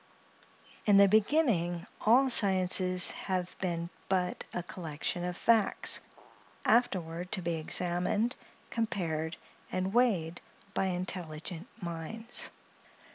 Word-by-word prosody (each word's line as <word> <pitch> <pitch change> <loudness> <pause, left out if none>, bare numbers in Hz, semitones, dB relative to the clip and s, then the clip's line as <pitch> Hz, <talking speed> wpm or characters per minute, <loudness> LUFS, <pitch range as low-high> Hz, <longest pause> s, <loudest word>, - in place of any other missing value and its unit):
In 205 -1 +6
the 200 0 +7
beginning, 200 - +2 0.2
all 250 +5 +5
sciences 185 -5 +4
have 185 -2 -3
been 170 -2 -3 0.2
but 185 -2 0
a 175 - -3
collection 170 0 -4
of 180 0 -4
facts, 225 -3 +4 0.6
afterward 180 -7 +1
to 195 - +2
be 170 0 -1
examined, 180 +8 0 0.4
compared, 170 -8 -2 0.3
and 185 +1 -2
weighed, 190 -9 +1 0.3
by - - 0
intelligent 180 -1 -4 0.2
minds. 175 +8 -3
185 Hz, 100 wpm, -30 LUFS, 170-210 Hz, 0.6 s, the